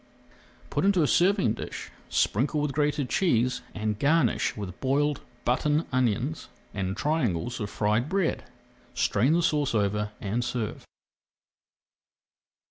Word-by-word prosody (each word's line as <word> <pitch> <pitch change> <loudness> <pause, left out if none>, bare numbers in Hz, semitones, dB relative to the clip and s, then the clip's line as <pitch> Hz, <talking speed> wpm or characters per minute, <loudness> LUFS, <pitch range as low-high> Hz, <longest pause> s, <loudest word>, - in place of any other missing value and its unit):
Put - - 0
into 190 -4 +4
a - - +2
serving 180 - +3
dish, - - -7 0.2
sprinkle 135 +8 +1
with 150 -1 0
grated 145 -1 0
cheese, 125 -9 +1
and 105 -1 -2
garnish 145 -7 +2
with 100 -3 -6
boiled 145 +2 +1 0.2
button 150 +6 +2
onions 130 +4 0 0.2
and 95 -1 -3
triangles 120 - 0
of 105 -2 -3
fried 110 +6 0
bread. 190 -3 0 0.5
Strain 130 +10 +2
the 170 +1 +2
sauce 145 -6 +1
over 105 0 0
and 110 +4 -1
serve. 120 -3 -4
125 Hz, 125 wpm, -27 LUFS, 105-150 Hz, 0.5 s, into